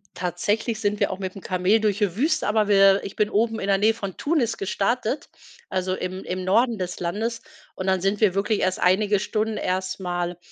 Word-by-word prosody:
Tatsächlich 205 +6 -1
sind 205 0 -1
wir - - +1
auch 190 - -5
mitm 190 0 -5
Kamel 185 +4 +2
durch 210 -1 0
die 200 -4 0
Wüste, 310 +6 +1
aber 210 0 +2
wir 195 -1 +5
ich 195 - -7
bin 210 -1 +1
oben 225 +1 +1
in 195 - -3
der 195 -1 +3
Nähe 215 +3 +3
von 200 -4 -6
Tunis 265 -8 0
gestartet, 220 +6 -1 0.4
also 185 0 -1
im 185 +1 -5
im 185 0 -4
Norden 225 +4 +2
des 180 -1 -4
Landes. 220 +7 -2 0.3
Und 185 - -5
dann 190 -1 +2
sind 195 +1 0
wir 200 -4 +4
wirklich 205 +2 0
erst 185 0 0
einige 200 +2 +3
Stunden 215 +1 -1
erst 185 +1 -2
mal, 175 -1 -3
200 Hz, 205 wpm, -24 LUFS, 185-220 Hz, 0.4 s, wir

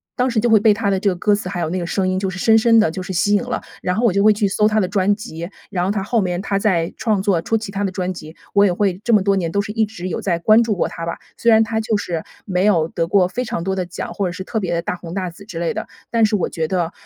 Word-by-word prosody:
当 250 +1 +1
时 235 -3 0
就 235 +2 +1
会 220 - +6
被 215 0 +5
她 205 -1 -1
的 195 -1 +1
这 200 - +2
个 185 - -1
歌 205 +4 +2
词 205 -3 -2
还 180 - -4
有 160 - -1
那 185 +2 -2
个 170 - -4
声 190 0 0
音 185 0 0
就 190 0 -1
是 190 - -6
深 220 +4 +4
深 230 0 +5
地 190 -7 +3
就 185 - -5
是 185 - -6
吸 205 +4 +2
引 205 - +3
了， 245 0 -3 0.2
然 180 - -1
后 230 +3 +1
我 220 - +3
就 200 +1 +2
会 215 - +7
去 210 0 0
搜 210 +2 +2
她 215 0 +2
的 185 - +1
专 200 0 +2
辑， 175 -6 -7 0.2
然 180 -3 -1
后 - - 0
她 200 -2 -2
后 225 +2 +1
面 180 -1 -2
她 195 0 -1
在 180 -5 +1
创 215 -4 0
作 190 -4 +1
初 225 +6 0
期 220 -2 -6
她 200 +1 -2
的 195 - -1
专 185 -1 -2
辑， 160 -2 -10 0.2
我 200 0 +5
也 195 - +3
会 190 -1 0
这 235 - +1
么 210 - +5
多 200 0 +2
年 170 -4 -1
都 200 - +1
是 200 - -6
一 220 0 +1
直 185 -4 -7
有 - - -3
在 175 -4 0
关 215 +6 +5
注 225 -3 0
过 180 - 0
她 165 - -6
吧。 170 - -4 0.2
虽 235 - +3
然 220 0 +6
她 220 0 -2
就 220 -1 0
是 170 -5 -3 0.2
没 185 -1 0
有 170 -7 +3
得 165 0 -2
过 185 0 +3
非 245 +7 -3
常 170 - -3
多 190 +1 -1
的 185 -1 -2
奖， 175 - -6
或 200 - -1
者 - - -3
是 185 +2 -6
特 220 +3 -2
别 180 -4 -2
地 170 - 0
大 180 - -3
红 170 -1 -9
大 185 -1 -2
紫 190 +4 -14
之 185 -5 -8
类 170 +5 -1
的， 220 - -5 0.2
但 230 -1 +4
是 210 - +1
我 195 - -1
觉 160 -1 -2
得， 175 -1 -1
195 Hz, 360 characters per minute, -20 LUFS, 180-215 Hz, 0.2 s, 会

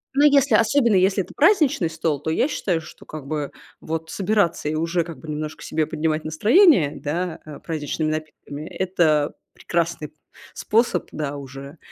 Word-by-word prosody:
Но, 285 +2 +5
если, 280 -2 +5
особенно, 235 -1 +3
если 190 +1 +3
это - - -14
праздничный 300 - +3
стол, 160 -2 -1
то 160 - -2
я 250 - +2
считаю, 180 - -1
что - - -14
как 155 -3 -9
бы 150 -1 -3 0.3
вот 160 0 -4
собираться 195 -4 0
и 155 - -2
уже 165 +2 0
как 165 -1 -9
бы 160 - -12
немножко 150 0 -5
себе 155 -1 -1
поднимать 155 0 -1
настроение, 210 - +4
да, 170 +3 -3
а, 150 -2 -9
праздничными 155 -1 -3
напитками, 155 -1 -6
это 160 -6 +1 0.2
прекрасный 170 -2 -2
п - - -38 0.4
способ, 220 -5 +1
да, 145 -2 -4
уже. 140 +2 -10
160 Hz, 165 wpm, -22 LUFS, 155-195 Hz, 0.4 s, Но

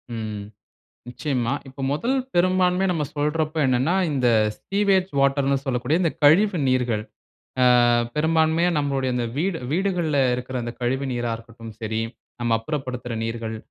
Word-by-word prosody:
ம். 110 -2 -4 0.7
நிச்சயமா. 125 -1 -2 0.2
இப்ப 135 +1 -9
முதல் 240 - 0 0.2
பெரும்பான்மைய 185 +1 +3
நம்ம 155 -3 -1
சொல்றப்ப 155 +2 -1
என்னனா, 130 +7 +2 0.2
இந்த 125 -3 +2 0.4
சீவேஜ் 195 -2 +1
வாட்டர் 140 0 +2
னு 140 - +3
சொல்லக்கூடிய, 125 +4 0
இந்த 165 - +2
கழிவு 180 +5 +5
நீர்கள். 120 -4 +1 0.6
ஆ, - - +6 0.5
பெரும்பான்மையா 160 +2 +2
நம்முடைய 135 -3 0
இந்த 120 -1 -1
வீடு, 170 +2 0
வீடுகள்ல 175 -5 0 0.2
இருக்குற 125 +1 -5
அந்த 120 0 -4
கழிவு 130 +3 -1
நீரா 120 -1 -2
இருக்கட்டும் 115 -1 -11
சரி, 110 0 -2 0.4
நம்ம 120 -1 +1
அப்புறப்படுத்துற 125 -2 -4
நீர்கள் 115 -1 -4
140 Hz, 135 wpm, -23 LUFS, 120-165 Hz, 0.7 s, ஆ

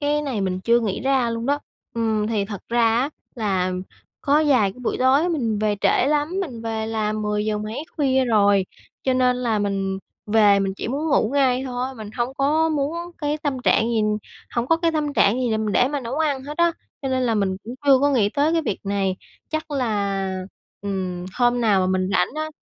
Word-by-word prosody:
cái 295 +1 +1
này 260 -8 -2
mình 185 -1 -1
chưa 235 +4 +3
nghĩ 210 -5 -2
ra 265 -2 +1
luôn 230 +1 -3
đó. 285 +1 +2 0.4
Ừm, 220 -2 0
thì 215 -3 0
thật 200 -1 -6
ra 235 0 +2
á 265 +5 +1 0.2
là 190 -6 0 0.5
có 280 - +1
vài 230 -9 +3
cái 250 - -18
buổi - - -1
tối 270 +6 +4
mình 235 -11 -1
về 210 -1 +1
trễ - - +3
lắm, 295 +1 +1
mình 255 -12 -5
về 220 -1 -2
là 220 -1 -1
mười 210 -1 -1
giờ 215 -1 -1
mấy 215 +7 -5
khuya 265 -3 +2
rồi, 205 -5 +3 0.4
cho 260 - +1
nên 250 -1 +3
là 235 -4 0
mình 195 -1 -1 0.3
về 210 -2 +5
mình 195 -1 -1
chỉ - - -4
muốn 290 +6 -2
ngủ 235 -6 +2
ngay 260 -2 +3
thôi, 255 +1 -3
mình 215 -3 -8
hông 245 +2 -1
có 305 +4 +2
muốn 300 +1 -1 0.2
cái 295 -1 -1
tâm 280 -3 -1
trạng - - +4
gì, 225 -2 +1 0.5
hổng 235 0 -1
có 330 - +4
cái 330 0 0
tâm 300 -2 -1
trạng 205 -6 +4
gì 245 - 0
là 220 - +1
mình 215 -2 -1
để 250 - +3
mà 290 0 -2
nấu 255 +3 -4
ăn 285 -4 0
hết 295 +3 -7
á, 340 0 +4 0.3
cho 270 - -2
nên 260 -1 0
là 235 -2 +1
mình 195 -3 0
cũng 235 +3 -6
chưa 275 -2 +7
có 285 +1 +3
nghĩ 230 -7 +3
tới 290 +7 +1
cái 330 -1 +2
việc 205 - -2
này. 195 -1 0 0.3
Chắc 310 0 -4
là, 200 -7 -1 0.4
ừm, 185 -3 -3
hôm 245 0 +2
nào 210 -5 +3
mà 185 - +1
mình 185 0 0
rảnh - - +2
á 310 0 -3
235 Hz, 225 wpm, -22 LUFS, 210-280 Hz, 0.5 s, chưa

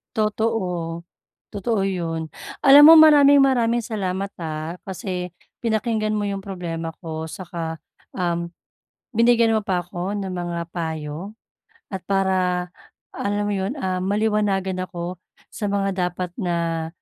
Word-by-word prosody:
Totoo. 190 -6 -1 0.5
Totoo 205 0 -1
'yun. 165 -4 -3 0.3
Alam 280 +2 +9
mo 325 - +11
maraming-maraming 275 -6 +6
salamat, 195 -2 -3
ah, 160 +1 -5
kasi 185 -1 -4 0.3
pinakinggan 220 -1 0
mo 210 - -1
'yung 200 -1 -2
problema 170 -4 -5
ko, 160 -1 -5
saka, 170 -2 -5 0.4
um, 170 -2 -1 0.7
binigyan 230 -1 +4
mo 215 - -1
pa 185 -2 0
ako 175 +2 -5
ng 200 -2 -3
mga 175 -2 -4
payo 160 +3 -4 0.6
at 190 - -3
para, 185 -2 +1 0.4
alam 205 +1 -2
mo - - -1
'yon, 195 +5 -2
ah, 185 -6 -1
maliwanagan 200 -1 0
ako 175 0 -6 0.3
sa 210 - -3
mga 200 0 0 0.2
dapat 180 0 -5
na 170 -3 -1
190 Hz, 125 wpm, -22 LUFS, 170-215 Hz, 0.7 s, mo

